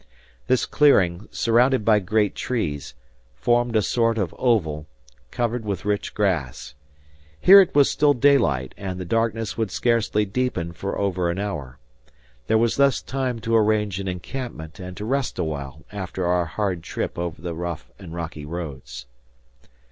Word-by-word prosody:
This 130 -1 +2
clearing, 100 -11 +3
surrounded 120 0 +2
by 110 -2 +5
great 105 +1 +1
trees, 75 - -3 0.4
formed 120 - +1
a 110 - +3
sort 115 +1 +1
of 95 -6 -1
oval, 80 -11 +1 0.4
covered 120 0 -2
with 100 -4 -4
rich 105 -1 -2
grass. 85 -12 -1 0.7
Here 195 +2 +9
it 185 - -1
was 145 -2 +6
still 145 -1 +3
daylight, 120 - +3
and 95 -2 -5
the 90 - -5
darkness 115 0 -1
would 110 -3 0
scarcely 110 -1 +1
deepen 100 -6 -2
for 100 +4 -4
over 90 -3 0
an 85 - -2
hour. 80 -11 -4 0.7
There 110 - +3
was 115 0 +1
thus 140 -2 +4
time 130 -2 -3
to 115 0 0
arrange 105 -3 +2
an 95 - -4
encampment 90 -3 -6
and 90 -1 -8
to 105 - -5
rest 135 +2 -1
awhile 75 -3 -4
after 95 -2 -4
our 90 0 +2
hard 90 +2 -2
trip 85 - -4
over 85 -2 -4
the 85 0 -5
rough 85 -1 -5
and 90 -5 -10
rocky 85 -3 -6
roads. 70 -7 -7
100 Hz, 155 wpm, -23 LUFS, 85-115 Hz, 0.7 s, Here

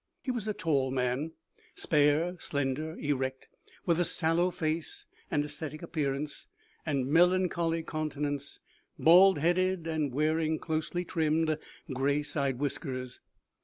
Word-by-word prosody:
He 260 - -1
was 235 -4 -3
a 215 - 0
tall 140 -5 +1
man, 130 +4 -1 0.4
spare, 150 +4 +2
slender, 145 +3 -2
erect, 130 -3 -2 0.4
with 170 -1 +2
a - - +4
sallow 170 +1 +2
face 160 -2 -2 0.2
and 145 - +1
ascetic 150 +1 -5
appearance, 150 -3 -3 0.4
and 140 -4 +1
melancholy 170 +1 +3
countenance 145 -3 -3 0.4
bald 180 +2 +7
headed, 175 +2 +1
and 155 -4 -1
wearing 155 +3 +1
closely 160 +3 -2
trimmed, 160 -1 +1 0.4
gray 140 +3 +1
side 140 -3 -1
whiskers. 130 -2 -3
155 Hz, 120 wpm, -30 LUFS, 145-165 Hz, 0.4 s, bald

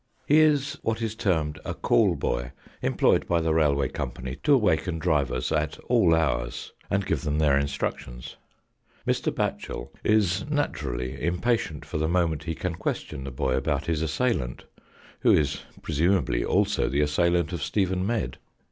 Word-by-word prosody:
He 150 +4 +5
is 150 -1 +2
what 115 0 -1
is 110 -2 -2
termed 80 -8 0
a - - -4
call - - +3
boy, - - -2 0.3
employed - - +2
by 85 - +2
the 80 -1 +1
Railway 70 -4 +2
Company 65 +1 -5
to 145 - +5
awaken 90 -7 +1
drivers 70 -7 0
at - - 0
all 80 - +5
hours, 75 -7 -1 0.2
and 100 0 0
give - - 0
them 75 -3 -1
their 75 -3 +4
instructions. 70 -2 -3 0.7
Mr. - - 0
Batchel - - -3
is 100 -3 +2
naturally 65 - -2
impatient 90 -1 0
for - - -4
the 80 - +1
moment 85 -3 0
he 80 -2 -2
can 90 +1 -3
question 70 -4 -4
the 65 - -5
boy 65 0 -1
about 65 - -1
his 80 -2 -1
assailant, 80 - -1 0.6
who - - +4
is 75 -2 +1 0.2
presumably 80 -4 +1
also - - +1
the 70 +2 +1
assailant 85 +3 +1
of 85 - -3
Stephen 95 +2 0
Medd. 100 - -2
80 Hz, 155 wpm, -26 LUFS, 70-95 Hz, 0.7 s, He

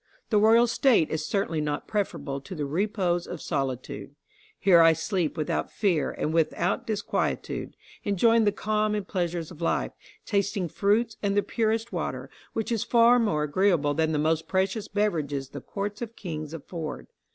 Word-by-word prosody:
The 210 - +5
royal 225 +3 +6
state 230 - +3
is 155 -1 -2
certainly 165 -4 0
not 150 -1 -3
preferable 170 -9 -2
to 160 +7 -8
the 150 -3 -2
repose 175 +2 0
of 175 - -6
solitude. 135 -2 -4 0.4
Here 175 -4 +6
I 165 0 +7
sleep 165 -1 -1
without 155 - -1
fear 180 -8 +1
and 155 - -3
without 165 +2 0
disquietude, 215 -1 -2 0.3
enjoying 225 +3 +3
the 205 - +4
calm 215 0 0
and 205 -3 -3
pleasures 175 -3 -2
of 170 -1 -12
life, 170 - 0 0.3
tasting 200 -3 0
fruits 215 +6 +1
and 200 -1 0
the 205 - +4
purest 225 0 -1
water, - - -4 0.2
which 225 +1 -2
is 225 -3 +1
far 235 +1 +5
more 160 -10 +1
agreeable 150 -1 +2
than 160 +1 +1
the 155 - 0
most 160 +2 +1
precious 195 +3 0
beverages 155 -10 -1
the 140 -1 -8
courts 205 - -5
of 230 -1 -5
kings 155 -6 -6
afford. 160 0 -6
185 Hz, 165 wpm, -27 LUFS, 155-210 Hz, 0.4 s, I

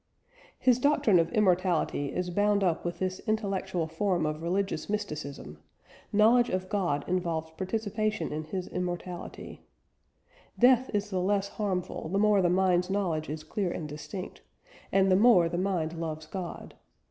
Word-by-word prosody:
His 250 -1 +3
doctrine 250 -9 +4
of 165 0 +1
immortality 180 -7 +1
is 180 0 -2
bound 205 +2 +2
up 170 -3 +1
with 175 0 -3
this 185 +1 -2
intellectual 195 -5 -1
form 175 +1 0
of 155 +1 -3
religious 180 0 -1
mysticism 150 - -5 0.5
knowledge 230 +4 +5
of 185 0 -2
God 175 -8 0
involves 170 -3 -1
participation 215 +3 -2
in 155 +1 -4
His 185 +3 -4
immortality: 180 0 -5 1.0
"Death 255 +1 +5
is 205 0 -2
the 185 -1 0
less 200 +1 +1
harmful 185 -6 -3
the 195 - 0
more 210 -1 +4
the 175 - +3
mind's 180 0 +2
knowledge 175 -6 -1
is 155 +1 -5
clear 185 +4 -2
and 160 -3 -4
distinct, 165 +6 -7 0.5
and 195 0 +3
the - - +6
more 200 -4 +6
the 175 +1 -2
mind 180 -4 -1
loves 160 -2 -5
God.... 175 +2 -7
185 Hz, 150 wpm, -29 LUFS, 165-205 Hz, 1.0 s, the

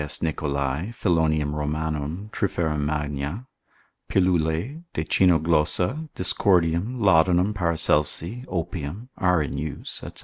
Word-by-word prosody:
Requies 75 0 -2
Nicholai, 70 +1 -1
Philonium 80 -6 +1
Romanum, 75 +5 -3
Triphera 85 -6 -1
magna, 75 - -3 0.6
pilulae, 90 - +1
de 80 - -1
Cynoglossa, 90 - +2
Dioscordium, 90 +5 +2
Laudanum 95 0 +4
Paracelsi, 85 - +1
Opium, 85 - -4
are 90 -4 +3
in 70 - -4
use, 75 0 -4
&c. - - -7
80 Hz, 100 wpm, -24 LUFS, 75-95 Hz, 0.6 s, Laudanum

